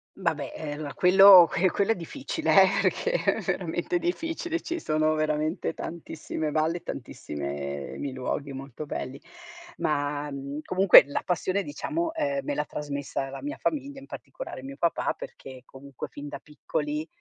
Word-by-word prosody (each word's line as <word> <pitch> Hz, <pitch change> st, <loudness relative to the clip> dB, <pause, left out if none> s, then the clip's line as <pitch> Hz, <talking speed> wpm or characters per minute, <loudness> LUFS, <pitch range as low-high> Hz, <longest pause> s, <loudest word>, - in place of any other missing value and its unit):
Vabbè, -, -, -2 dB
ehm, 150 Hz, -1 st, -5 dB
allora 145 Hz, -, -6 dB
quello 185 Hz, -1 st, +9 dB
que 185 Hz, +2 st, +3 dB
quello 200 Hz, +5 st, +1 dB
è -, -, +2 dB
difficile, 205 Hz, -, +2 dB
eh, -, -, +5 dB
perché 475 Hz, -, +1 dB, 0.2 s
è -, -, -4 dB
veramente 350 Hz, -1 st, -1 dB
difficile: 330 Hz, -1 st, -2 dB
ci 340 Hz, +1 st, -3 dB
sono 155 Hz, -, +1 dB
veramente 155 Hz, +2 st, -1 dB
tantissime 155 Hz, -2 st, -5 dB
valli, 160 Hz, +3 st, 0 dB
tantissime 70 Hz, -1 st, -5 dB
mi 140 Hz, -, -4 dB
luoghi 135 Hz, +2 st, -3 dB
molto 135 Hz, +2 st, -7 dB
pelli. 135 Hz, -1 st, -5 dB, 0.6 s
Ma, 145 Hz, 0 st, -1 dB
mhmm, 140 Hz, +2 st, -5 dB
comunque 185 Hz, 0 st, +8 dB
la 145 Hz, -, -2 dB
passione, 185 Hz, +3 st, 0 dB
diciamo, 320 Hz, -, -3 dB
ehm, 285 Hz, -3 st, -1 dB
me 295 Hz, -, -2 dB
l'ha -, -, -1 dB
trasmessa 140 Hz, -2 st, -4 dB
la 135 Hz, -, -7 dB
mia 290 Hz, +1 st, -5 dB
famiglia, 280 Hz, -2 st, -2 dB
in 275 Hz, -, -14 dB
particolare -, -, -8 dB
mio 135 Hz, +1 st, -8 dB
papà, 170 Hz, -1 st, +1 dB
perché 130 Hz, -1 st, -10 dB
comunque 135 Hz, -1 st, -9 dB
fin 145 Hz, 0 st, -8 dB
da -, -, -6 dB
piccoli 295 Hz, -, -4 dB
155 Hz, 155 wpm, -27 LUFS, -, 0.6 s, quello